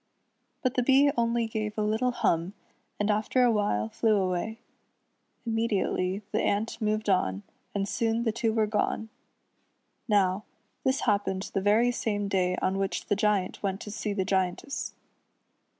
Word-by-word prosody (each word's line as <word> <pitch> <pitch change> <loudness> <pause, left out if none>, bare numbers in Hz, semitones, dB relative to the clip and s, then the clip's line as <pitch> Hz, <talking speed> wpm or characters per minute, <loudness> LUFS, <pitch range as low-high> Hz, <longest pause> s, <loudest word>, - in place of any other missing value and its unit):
But 255 -2 +1
the 250 - +2
Bee 275 +3 +5
only 235 -1 +1
gave 215 -1 -3
a 215 - +1
little 220 +4 +1
hum, 195 -6 0 0.4
and 205 +1 +2
after 215 +4 +2
a 245 - +5
while 205 - +1
flew 220 - +2
away. 190 +3 -1 0.9
Immediately 210 -4 0
the - - +1
ant 215 +3 -1
moved 215 0 0
on, 100 - +1 0.3
and 200 -1 0
soon 225 +2 0
the 225 - +1
two 225 0 0
were 220 -1 +2
gone. 215 +1 -1 1.0
Now, 200 -2 +2 0.4
this 265 -2 +1
happened 200 -3 0
the 195 - +1
very 220 +5 +4
same 205 -4 -1
day 185 -2 +1
on 190 +1 +1
which 195 -1 -2
the 205 - +3
Giant 200 -2 0
went 195 -1 -1
to 210 - -7
see 210 0 -3
the 195 -2 -1
Giantess. 190 +7 -1
210 Hz, 155 wpm, -28 LUFS, 195-225 Hz, 1.0 s, Bee